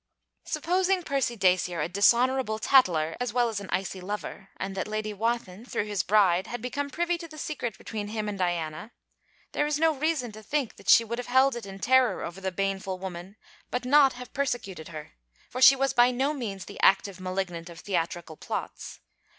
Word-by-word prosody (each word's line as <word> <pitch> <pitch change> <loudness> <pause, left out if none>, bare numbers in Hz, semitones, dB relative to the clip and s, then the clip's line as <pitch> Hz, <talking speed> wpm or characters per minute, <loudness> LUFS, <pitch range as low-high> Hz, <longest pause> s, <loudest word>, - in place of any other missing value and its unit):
Supposing 355 +3 +1
Percy 275 -5 -1
Dacier 180 -3 +2
a 150 - 0
dishonourable 235 +5 +3
tattler 175 - +3
as 245 -3 -2
well 240 -1 +2
as 215 -3 -3
an 200 - -9
icy 185 0 -2
lover, 195 0 -6
and 195 +1 -4
that 190 +1 -3
Lady 215 0 -3
Wathin, 225 -2 -2
through 240 - -2
his 205 -3 -1
bride, 190 -3 +3
had 245 - -5
become 280 +4 -3
privy 345 +4 -1
to 335 - -8
the 310 -1 -13
secret 255 -8 -4
between 210 -2 -5
him 215 0 -3
and 210 - -3
Diana? 175 +2 -3 0.6
There 295 - 0
is 300 0 -1
reason 310 -5 +1
to 215 +1 -11
think 275 +1 -2
that - - -8
she 230 - +8
would 235 +2 -4
have 245 - -5
held 260 +1 +4
it 235 -4 -7
in 195 0 -8
terror 255 +3 +3
over 175 +3 -7
the 190 0 -2
baneful 195 0 -2
woman, 185 +1 -7 0.3
but 250 0 -3
not 275 0 +5
have 250 0 -10
persecuted 240 - -3
her: 155 -3 -9 0.4
for 255 - -4
she 270 - +9
was 270 0 0
by 240 +1 +5
no 265 +4 0
means 205 -9 -5
the - - -10
active 195 -1 +3
malignant 185 -2 -4
of 170 0 -11
theatrical 170 -4 -3
plots. - - -6
215 Hz, 195 wpm, -27 LUFS, 190-260 Hz, 0.6 s, she